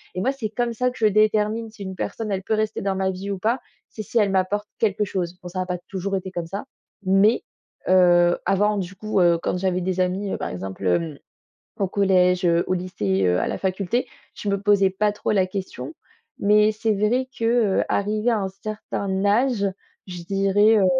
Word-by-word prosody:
et 185 - -2
moi, 260 - +2
c'est 260 -6 -4
comme 235 +2 -1
ça 250 +2 0
que - - -13
je 220 - +4
détermine 215 +1 +2
si 215 - -14
une 190 -1 -6
personne, 220 +3 -4
elle 190 -1 -2
peut 220 - -1
rester 215 0 -1
dans 195 -1 -1
ma 190 0 0
vie 190 +2 -5
ou 195 - -3
pas, 230 +6 +1 0.3
c'est 215 - -7
si 230 - 0
elle 205 -2 +3
m'apporte 195 +2 0
quelque 210 -1 +1
chose. 180 -3 -3
Bon, 180 - -8
ça 185 +1 -5
n'a 185 - -1
pas 180 -1 -3
toujours 195 0 -2
été 190 0 -4
comme 175 -2 -4
ça, 195 +5 -5 0.4
mais 195 +4 +4 0.4
heu, 175 -1 +5
avant 205 +2 +2
du 190 -1 -4
coup, 215 +1 -1
heu, 170 -1 +4
quand - - -1
j'avais 185 0 0
des 185 +1 -2
amis, 185 +2 -1
heu, - - -2
par - - -4
exemple, 95 +1 -6
hem, 150 - 0 0.6
au 195 - +1
collège, 185 -2 +3
heu, 170 0 +3
au - - +1
lycée, 105 - -1
heu, 90 0 +2
à - - -1
la - - -2
faculté, 195 +5 -1 0.3
je - - -7
me 200 -1 0
posais 200 -1 +4
pas 210 +2 +1
trop 210 - -2
la 190 -3 +2
question 190 +10 -6 0.5
mais 210 +1 +5
c'est 215 +1 0
vrai 235 +6 +1
que, - - -4
heu, 230 -4 +3
arrivée 210 +3 0
à 225 - +1
un 195 - -1
certain 200 -1 -4
âge, 220 +1 +2 0.4
je 180 -2 -7
dirais 200 +4 +3
heu, 195 - +4
195 Hz, 215 wpm, -23 LUFS, 185-215 Hz, 0.6 s, heu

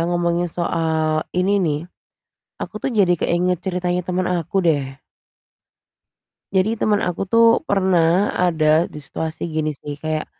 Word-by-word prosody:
ngomongin 175 0 0
soal 160 -2 0 0.2
ini 185 +2 +2
nih, 150 -2 0 0.8
aku - - -6
tuh - - 0
jadi 180 -2 +4
keinget 180 +1 +1
ceritanya 180 -1 -1
temen 185 0 -1
aku, 170 +2 -5
deh. 150 -4 +3 1.7
Jadi 190 +4 +2
temen 210 -1 +3
aku 185 0 -3
tuh 230 +1 +5
pernah 190 - +2
ada 165 -2 +2
di - - -11
situasi 155 +3 -5
gini 155 -1 0
sih, 145 0 -7
kayak, 155 -1 -2
175 Hz, 135 wpm, -20 LUFS, 160-185 Hz, 1.7 s, tuh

